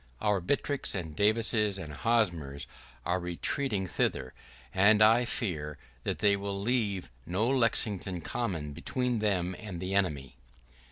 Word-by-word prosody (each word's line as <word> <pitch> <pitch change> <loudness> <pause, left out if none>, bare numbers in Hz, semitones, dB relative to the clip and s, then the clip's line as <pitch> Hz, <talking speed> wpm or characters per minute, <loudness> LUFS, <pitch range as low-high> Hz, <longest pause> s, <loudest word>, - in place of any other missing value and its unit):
Our 105 -3 +1
Buttricks 140 +7 0
and 80 -5 -4
Davises 105 0 +2
and 80 -5 -7
Hosmers 85 -10 0 0.4
are 90 +1 +1
retreating 95 +5 -1
thither, 65 -6 -1 0.4
and 105 +3 +5
I 115 +3 +6
fear 75 -11 -2 0.3
that - - -1
they 100 -1 +4
will 100 0 -3
leave 100 - 0 0.2
no 95 +6 +1
Lexington 105 -7 +1
Common 85 -12 -3
between 125 - -1
them 95 -4 0
and 95 -5 -6
the 95 +2 -3
enemy. 70 -10 -1
100 Hz, 130 wpm, -30 LUFS, 85-110 Hz, 0.4 s, I